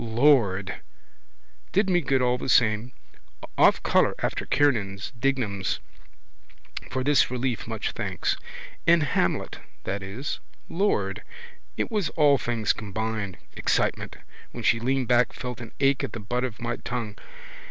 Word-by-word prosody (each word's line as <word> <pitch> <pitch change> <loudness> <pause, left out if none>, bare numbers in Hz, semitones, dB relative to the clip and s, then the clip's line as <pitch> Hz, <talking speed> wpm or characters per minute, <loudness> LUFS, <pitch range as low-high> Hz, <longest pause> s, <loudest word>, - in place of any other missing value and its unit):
Lord! 110 - +2 0.9
Did 200 +1 +2
me 175 -2 +3
good 135 -3 +1
all 125 0 +2
the - - -4
same. 115 -1 +3 0.6
Off - - +5
colour - - +3
after - - -2
Kiernan's, 105 -9 +1
Dignam's. 120 -6 -1 1.1
For 130 0 -2
this 145 -1 +4
relief 125 -2 -2
much - - -2
thanks. - - -1 0.5
In 170 0 +6
Hamlet, 125 -11 0 0.2
that 100 +1 -3
is. 100 +9 -4 0.3
Lord! 200 +4 0 0.6
It - - -1
was 210 -5 0
all 145 -3 +5
things 115 -3 0
combined. 105 -2 -4 0.2
Excitement. - - 0 0.4
When - - -6
she 115 - +3
leaned 130 +1 0
back, 125 -1 +3
felt 125 -2 -6
an 115 - -8
ache 135 -1 +3
at - - -4
the 115 - -5
butt 120 +4 -2
of 125 -4 -4
my 120 0 -2
tongue. 115 -4 -4
125 Hz, 140 wpm, -26 LUFS, 110-135 Hz, 1.1 s, In